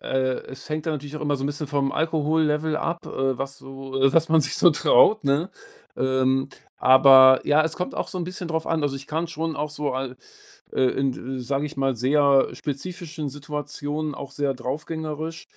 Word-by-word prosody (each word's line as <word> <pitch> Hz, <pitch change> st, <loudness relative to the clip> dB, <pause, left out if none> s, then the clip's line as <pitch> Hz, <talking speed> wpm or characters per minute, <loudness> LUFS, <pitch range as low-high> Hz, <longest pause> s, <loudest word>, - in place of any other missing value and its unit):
Äh, 130 Hz, -1 st, -1 dB
es 135 Hz, +3 st, -11 dB
hängt 155 Hz, 0 st, -3 dB
da -, -, +1 dB
natürlich 145 Hz, -1 st, -5 dB
auch 155 Hz, -, -7 dB
immer 145 Hz, -1 st, 0 dB
so 135 Hz, -, -6 dB
'n -, -, 0 dB
bisschen 145 Hz, +1 st, -4 dB
vom 140 Hz, -1 st, 0 dB
Alkohollevel 155 Hz, 0 st, 0 dB
ab, 170 Hz, +2 st, -3 dB
äh, 135 Hz, -2 st, -1 dB
was 135 Hz, 0 st, -4 dB
so 135 Hz, 0 st, -9 dB
äh, 135 Hz, 0 st, +4 dB
was 165 Hz, +1 st, +3 dB
man 160 Hz, 0 st, +5 dB
sich 145 Hz, -, -1 dB
so 175 Hz, -, +6 dB
traut, 170 Hz, -, +4 dB
ne? 145 Hz, +6 st, +1 dB, 0.5 s
Ähm, 130 Hz, 0 st, +1 dB, 0.3 s
aber 130 Hz, 0 st, +7 dB
ja, 150 Hz, +1 st, +4 dB
es 160 Hz, 0 st, -2 dB
kommt 180 Hz, -, -4 dB
auch -, -, -3 dB
so 185 Hz, -, -5 dB
'n 175 Hz, -, -2 dB
bisschen 180 Hz, 0 st, -6 dB
drauf 160 Hz, -1 st, -2 dB
an. 165 Hz, -2 st, 0 dB
Also, 145 Hz, -2 st, -1 dB
ich 135 Hz, 0 st, -8 dB
kann 160 Hz, +2 st, -2 dB
schon 160 Hz, -1 st, -4 dB
auch 150 Hz, +1 st, -3 dB
so 150 Hz, -2 st, -3 dB
al 130 Hz, -1 st, -4 dB, 0.6 s
äh, -, -, -1 dB
in 135 Hz, +1 st, +1 dB
d 130 Hz, +1 st, -6 dB
sage 135 Hz, +3 st, -2 dB
ich 150 Hz, -, -8 dB
mal, 135 Hz, -1 st, 0 dB
sehr 140 Hz, +3 st, +3 dB
spezifischen 155 Hz, +1 st, -6 dB
Situationen 145 Hz, +1 st, -5 dB
auch 140 Hz, -1 st, -8 dB
sehr 140 Hz, -1 st, -1 dB
draufgängerisch 155 Hz, +5 st, -5 dB
145 Hz, 205 wpm, -24 LUFS, 135-155 Hz, 0.6 s, aber